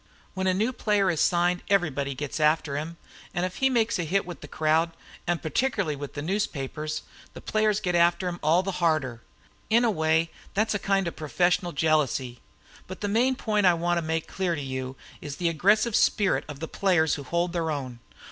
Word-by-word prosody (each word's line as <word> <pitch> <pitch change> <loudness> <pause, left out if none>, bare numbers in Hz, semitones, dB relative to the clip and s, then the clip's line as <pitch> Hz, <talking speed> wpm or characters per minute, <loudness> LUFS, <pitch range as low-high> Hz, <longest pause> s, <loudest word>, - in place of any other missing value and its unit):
When 190 0 -1
a 185 - +3
new 220 +6 0
player 205 -5 +2
is 160 - -1
signed 175 0 +2
everybody 145 -8 +1
gets 145 +3 -4
after 150 -1 +2
him, 160 +3 -4 0.4
and 175 0 +1
if 185 - -5
he 265 - +3
makes 230 -5 +1
a - - 0
hit 190 +5 0
with 175 -1 -8
the - - -9
crowd, 160 +2 +1 0.3
and 175 -1 0
particularly 190 - 0
with 145 0 -8
the 145 - -4
newspapers, 155 -4 -3 0.3
the - - -7
players 215 -1 +1
get 180 -3 -1
after 175 +1 +3
him 175 0 -4
all 165 +4 +3
the 195 - -2
harder. 150 -8 +1 0.5
In 235 +2 +4
a 230 - +3
way, 160 -2 +1 0.2
that's 215 +2 +2
a 205 - -1
kind 195 -2 +1
of 170 - -4
professional 175 +3 +1
jealousy. 145 -6 0 0.5
But 185 - -8
the 205 - -1
main 245 +5 +2
point 210 -5 +1
I 175 - +5
want 175 +1 0
to - - -2
make 160 0 -2
clear 180 -3 -1
to 150 - -4
you 130 -1 -4 0.3
is 145 -2 -6
the 170 +1 0
aggressive 205 +7 +3
spirit 200 -3 +2
of 145 -1 -9
the 160 - -3
players 175 -5 +2
who - - -3
hold 170 +5 -1
their 165 -2 -1
own. 130 -5 -4
170 Hz, 205 wpm, -26 LUFS, 155-195 Hz, 0.5 s, I